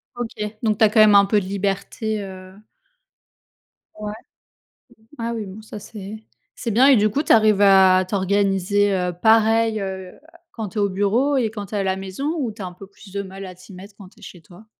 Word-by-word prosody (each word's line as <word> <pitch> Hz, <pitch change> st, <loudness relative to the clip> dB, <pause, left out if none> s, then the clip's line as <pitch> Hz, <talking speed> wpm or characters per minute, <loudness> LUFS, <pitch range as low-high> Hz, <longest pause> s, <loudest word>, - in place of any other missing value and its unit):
OK, 220 Hz, -3 st, -5 dB
donc 215 Hz, -2 st, +1 dB
tu 220 Hz, -, +5 dB
as -, -, +3 dB
quand 215 Hz, +1 st, +4 dB
même 210 Hz, -1 st, +6 dB
un 200 Hz, 0 st, +7 dB
peu 205 Hz, +1 st, +1 dB
de -, -, -7 dB
liberté, 200 Hz, +2 st, -3 dB
heu 185 Hz, -1 st, -10 dB, 1.5 s
Ouais. 210 Hz, 0 st, -5 dB, 1.1 s
Ah 230 Hz, 0 st, -3 dB
oui, 220 Hz, -2 st, -4 dB
bon, 195 Hz, +3 st, -10 dB
ça 215 Hz, -1 st, -10 dB
c'est, 205 Hz, 0 st, -9 dB, 0.4 s
c'est 230 Hz, -, -4 dB
bien. 255 Hz, +6 st, +5 dB
Et 275 Hz, -, +7 dB
du 210 Hz, 0 st, +3 dB
coup, 290 Hz, +8 st, -1 dB
tu -, -, -1 dB
arrives 215 Hz, -2 st, +4 dB
à 190 Hz, -2 st, +5 dB
t'organiser, 200 Hz, 0 st, +1 dB
heu, 180 Hz, -1 st, -1 dB
pareil, 220 Hz, +3 st, +3 dB
heu, 190 Hz, -1 st, -7 dB, 0.3 s
quand 220 Hz, -4 st, -6 dB
tu 220 Hz, -, -11 dB
es 210 Hz, -, +1 dB
au 200 Hz, -, +1 dB
bureau 220 Hz, +9 st, +1 dB
et 230 Hz, -4 st, +1 dB
quand 205 Hz, -3 st, -7 dB
tu 215 Hz, -, -7 dB
es -, -, 0 dB
à 195 Hz, -, 0 dB
la 190 Hz, 0 st, 0 dB
maison? 195 Hz, -, -4 dB
Ou 250 Hz, -6 st, -2 dB
tu 210 Hz, 0 st, -12 dB
as -, -, -4 dB
un 180 Hz, -, -8 dB
peu 195 Hz, +2 st, -13 dB
plus 195 Hz, 0 st, -17 dB
de 200 Hz, 0 st, -3 dB
mal 195 Hz, 0 st, -9 dB
à 185 Hz, -, -9 dB
t'y 185 Hz, +2 st, -15 dB
mettre 200 Hz, +2 st, -12 dB
quand 190 Hz, -3 st, -13 dB
tu -, -, -25 dB
es -, -, -20 dB
chez 175 Hz, -, -12 dB
toi? 180 Hz, +6 st, -17 dB
205 Hz, 230 wpm, -21 LUFS, 190-220 Hz, 1.5 s, un